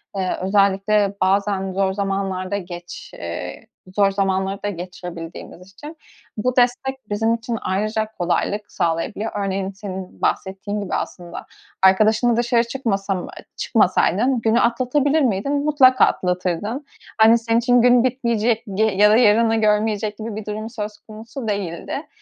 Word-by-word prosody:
eee, 185 -2 -1
özellikle 200 +1 +2
bazen 195 0 +1
zor 190 0 +1
zamanlarda 195 -1 -2
geç 175 -2 -9
eee, 85 -8 -7 0.3
zor 200 -1 +4
zamanlarda 195 +1 -1
geçirebildiğimiz 180 0 -8
için, 295 +11 -11 0.4
bu 250 +4 -1
destek 250 0 0
bizim 225 +2 +1
için 230 0 -3
ayrıca 215 +3 -1
kolaylık 200 +4 -1
sağlayabiliyor. 170 +6 -2
Örneğin, 195 -1 -2
senin 190 -2 -8
bahsettiğin 200 +2 -2
gibi 200 - -3
aslında, 175 -1 -6 0.4
arkadaşınla 215 +5 +4
dışarı 240 0 +2
çıkmasam 200 -7 -2
eee, - - -11
çıkmasaydın 245 +4 +2
günü 225 +1 +3
atlatabilir 265 +6 +2
miydin? 245 +1 0
Mutlaka 265 -4 +5
atlatırdın. 185 - -2 0.3
Hani, 225 +1 +6
senin 230 0 +1
için 245 +1 +3
gün 245 0 +5
bitmeyecek 235 -3 0
g 215 - +2
ya 210 -1 +4
da - - +5
yarını 225 -1 +4
görmeyecek 210 -1 +1
gibi 220 -1 -6
bir 215 -1 -6
durum 215 +1 -5
söz 210 -2 -6
konusu 225 +4 -9
değildi. 195 -5 -4
210 Hz, 130 wpm, -21 LUFS, 190-230 Hz, 0.4 s, Hani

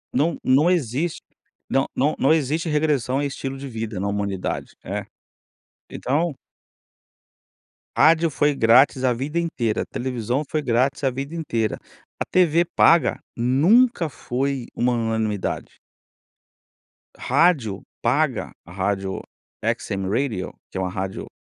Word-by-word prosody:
Não 150 +6 +2
não 145 +7 +4
existe, 160 0 -1 0.5
não 135 0 +2
não 145 +4 +1
não 140 - +4
existe 160 +2 0
regressão 145 -4 +1
em - - 0
estilo 135 -1 -4
de 140 +1 -7
vida 110 -4 -5
na 100 - -1
humanidade, 100 -2 -3
é. - - -4 0.8
Então 150 +4 -1 1.6
Rádio 165 0 +5
foi 145 0 +2
grátis 130 +3 +5
a 125 -1 +3
vida 140 +7 -3
inteira, 125 -10 -1
televisão 125 +1 -2
foi 155 -1 -1
grátis, 130 +4 +1
a 135 - +2
vida 140 +6 -5
inteira, 115 -9 -1 0.4
a - - -1
tv 175 -1 +3
paga 165 -4 +4 0.2
nunca 165 - +3
foi 130 0 -2
uma 125 0 +1
unanimidade. 110 -3 -2 1.4
Rádio 135 - +2 0.2
paga, 135 +3 +1
a 85 - -13
rádio 95 +1 -2 0.4
XM 95 -1 -1
Radio, 110 -5 -1 0.2
que - - -6
é 95 - -1
uma 95 - -1
rádio 95 +1 -4
130 Hz, 125 wpm, -23 LUFS, 115-155 Hz, 1.6 s, Rádio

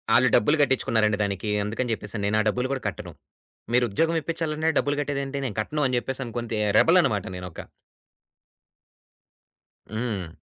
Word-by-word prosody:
ఆళ్లు 125 - +5
డబ్బులు 150 +9 +3
కట్టించుకున్నారండి 110 -6 +2
దానికి. 100 +1 -3 0.2
అందుకని 115 +3 -2
చెప్పేసాను 105 -1 -4
నేను. 110 +1 +1
ఆ - - 0
డబ్బులు 125 +4 -1
కూడా 135 - -4
కట్టాను. - - -6 0.6
మీరు 125 0 +4
ఉద్యోగం 165 +10 +1
ఇప్పించాలంటే 160 -1 -1
డబ్బులు 145 0 0
కట్టేదేంటి? 140 -1 -3
నేను 115 -6 -4
కట్టాను 150 +7 -2
అని 125 - 0
చెప్పేసి 130 -2 -5
కొంత 115 -1 -5 0.3
రెబెల్ 175 +3 +6
అన్నమాట. 105 - 0
నేనొక. 90 -2 -8 2.3
హ్మ్. 110 -7 -4
125 Hz, 145 wpm, -25 LUFS, 105-145 Hz, 2.3 s, రెబెల్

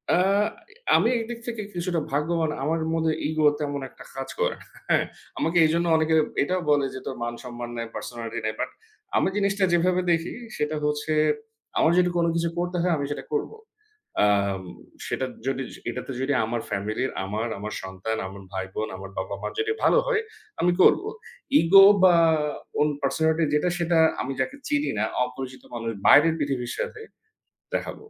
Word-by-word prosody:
আ - - +3 0.8
আমি - - +4
এইদিক 230 +1 -5
থেকে 230 -2 -3
কিছুটা 175 -1 -1
ভাগ্যবান। 160 +2 0
আমার 160 +3 0
মধ্যে 160 -1 +1 0.2
ego 155 0 +1
তেমন 145 -1 -2
একটা - - -14
কাজ 135 0 -5
করে - - +1
না। - - -15 0.2
হ্যাঁ। - - +3 0.3
আমাকে 165 +2 0
এইজন্য 170 +2 +2
অনেকে 160 0 +2 0.3
এটাও 185 +5 -1
বলে 145 -1 +3
যে, - - -5
"তোর 130 - -4
মান-সম্মান 120 0 -6
নাই, 115 - -2
personality 115 -1 -5
নাই।" 110 - 0
But - - -1 0.5
আমি - - +3
জিনিসটা 200 -1 +1
যেভাবে 180 +1 +3
দেখি 165 0 0 0.2
সেটা 150 +1 -1
হচ্ছে, 150 +1 0 0.6
আমার 160 - +4
যদি 180 0 +3
কোন 170 - +3
কিছু 170 0 +1
করতে 175 +1 -1
হয় 175 0 +2
আমি 140 - -2
সেটা - - -4
করব। 440 - -1 0.7
আম 100 -2 +2 0.5
সেটা 130 - -1 0.2
যদি, 135 0 -1 0.3
এটাতে 125 +3 -5
যদি 140 +2 +1
আমার 115 +1 -2
family 105 +3 -2
র, - - -8
আমার, 105 +4 -2
আমার 105 +1 -5
সন্তান, 95 +4 -4
আমার 95 +1 -10
ভাইবোন, 95 +3 -3
আমার 95 0 -8
বাবা-মার 100 +1 -4
যদি 435 0 +1
ভালো - - +5
হয় 445 -3 +2 0.4
আমি 180 - +4
করব। - - +6 0.6
Ego 195 +4 +8 0.2
বা 180 -2 +7 0.6
own 150 +1 +4
personality 160 +3 +2
যেটা 150 +4 +2
সেটা 170 -1 +2 0.2
আমি 135 - -3
যাকে 260 - -2
চিনি 295 0 +1
না, - - +2 0.2
অপরিচিত 130 +1 -6
মানুষ, 115 -1 -3 0.2
বাইরের 160 +3 +7
পৃথিবীর 135 -4 -2
সাথে 435 - -4 0.7
দেখাব। - - -2
150 Hz, 165 wpm, -25 LUFS, 120-175 Hz, 0.8 s, Ego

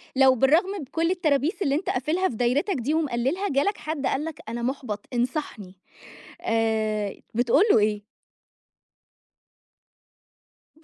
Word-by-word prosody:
لو 265 -1 +6
بالرغم 305 +10 +3
من 285 - -6
كل 330 +5 -1
الترابيس 320 - 0
اللي 275 -6 +1
أنت 330 - -2
قافلها 315 +9 0
في 230 - -6
دايرتك 255 - +1
دي 270 +3 -1
ومقلّلها، 310 +5 0
جالك 285 +9 +1
حد 310 -3 -4
قال 275 +3 0
لك: 320 -2 -7
"أنا، 235 +1 -4
مُحبَط، 245 -5 -3
انصحني." 240 - -3 0.7
آآ، 220 -2 0 0.2
بتقول 245 - +3
له - - +6
إيه؟ 210 0 0 2.7
برضه؟ 315 - -26
270 Hz, 135 wpm, -25 LUFS, 235-315 Hz, 2.7 s, لو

